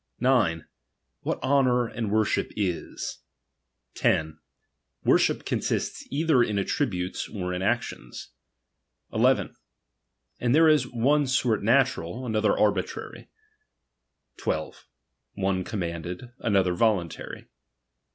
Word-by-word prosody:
III. - - -9
9. 100 -11 +3 0.6
What - - -3
honour 130 -3 +3
and 115 -2 -4
worship 110 -1 +1
is. 90 -5 -3 0.7
10. 80 0 0 0.6
Worship - - +3
^^^■iiwist« - - -2
either 150 -2 +3
in 105 -3 +1
attributes 95 -4 -1
or 90 -4 -4
in 90 - -3
actions. 60 -8 -3 0.8
11. - - +2 0.8
And 120 +2 +2
there 160 +1 +6
is 150 -5 +4
^^^■le 135 +5 +2
sort 125 -5 +2
natural, 120 -2 +1
another 110 -3 +2
arbitrar). 100 -3 0 1.2
12. - - -3 0.5
One 95 -1 0
commanded, 90 +3 -5
^^^■other 95 -4 +2
voluntary. 95 -5 -1
110 Hz, 100 wpm, -26 LUFS, 90-125 Hz, 1.2 s, there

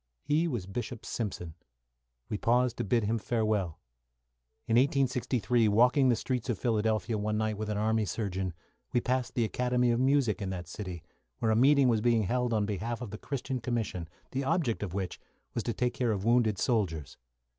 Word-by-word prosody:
He 160 +3 +2
was 120 - -3
Bishop 120 +4 -5
Simpson. 90 -7 -4 0.7
We - - -3
paused 125 +1 +2
to - - -1
bid 115 +3 +1
him 110 +2 0
farewell. 105 -6 0 0.9
In 115 - +2
1863, 125 -4 +2
walking 125 +5 +4
the 120 - +4
streets 125 +2 -3
of 115 - 0
Philadelphia 110 0 0
one 105 +1 -1
night 110 0 0
with 105 +1 -4
an 105 - -1
army 110 +1 +1
surgeon, 95 -4 -3 0.4
we 120 - +4
passed 125 +1 -1
the 120 - +2
Academy 125 +1 +1
of 120 - +1
Music 130 -5 +2
in 95 - -2
that 90 -3 -5
city, 90 -2 -6 0.3
where 110 - +1
a - - +3
meeting 135 +3 +5
was 115 -3 +3
being 115 -1 +3
held 125 +4 0
on 105 -2 +2
behalf 110 +3 -3
of 120 -5 -6
the 105 - -7
Christian 135 -1 -3
Commission, 110 -8 -2 0.2
the 135 +1 -1
object 150 -5 0
of 95 -3 -4
which 95 -3 -3 0.3
was 115 - -1
to 120 - 0
take 125 +1 0
care 120 -3 0
of 100 -1 -2
wounded 115 -3 +3
soldiers. 90 - -1
115 Hz, 190 wpm, -30 LUFS, 105-125 Hz, 0.9 s, meeting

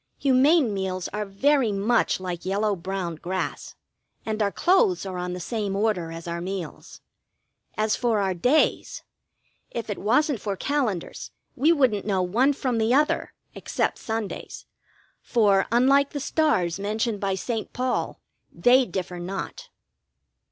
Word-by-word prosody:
Humane 270 -1 +4
meals 190 -2 -3
are 210 0 -4
very 255 +4 +2
much 205 +3 +1
like 180 -2 -5
yellow 205 +2 0
brown 180 -2 -4
grass, 185 +3 -4 0.5
and 220 0 -2
our 200 -1 +2
clothes 370 - +2
are 185 -2 -4
on 180 0 -3
the 180 - -5
same 205 +1 -3
order 200 -5 0
as 165 +1 -8
our 170 0 -3
meals. 185 -3 -6 0.8
As 215 0 +1
for 235 -4 +1
our 190 -2 +1
days, 250 - +1 0.7
if 230 -2 -5
it 205 - -4
wasn't 250 +3 +2
for 200 -2 -2
calendars 250 - -2 0.3
we 295 +6 +4
wouldn't 250 - +2
know 190 -3 +1
one 240 +10 +2
from 255 -4 -1
the 220 +1 +1
other, 300 +2 +1 0.2
except - - -2
Sundays, 220 -2 -5 0.6
for, 205 -5 +3
unlike 275 +4 +4
the 290 - -2
stars 265 - +1
mentioned 215 +2 -1
by 195 -1 0
St. 225 +3 -4
Paul, 255 0 -2 0.3
they 250 +1 +4
differ 180 -2 -4
not. 195 - -6
210 Hz, 145 wpm, -25 LUFS, 190-255 Hz, 0.8 s, Humane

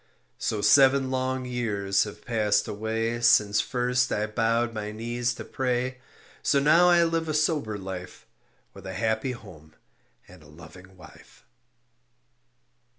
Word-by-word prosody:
So 105 - -2
seven 135 +3 +5
long 130 0 -2
years 105 -6 -1
have 105 - -11
passed 110 -3 +1
away 110 +2 -2
Since 105 -3 +4
first 125 0 0
I 105 - 0
bowed 115 +2 0
my 105 -1 -5
knees 120 +2 -3
to - - -8
pray; 130 0 -2 0.4
So - - +2
now 165 +5 +5
I 175 -1 +5
live 165 -1 -1
a 155 - -1
sober 150 -9 0
life 95 -2 -8 0.5
With - - -11
a 95 - -6
happy 110 +5 -1
home 80 -9 -14 0.5
and 90 -2 -16
a 75 - -17
loving 90 +5 -15
wife. - - -17
115 Hz, 140 wpm, -26 LUFS, 105-130 Hz, 0.5 s, seven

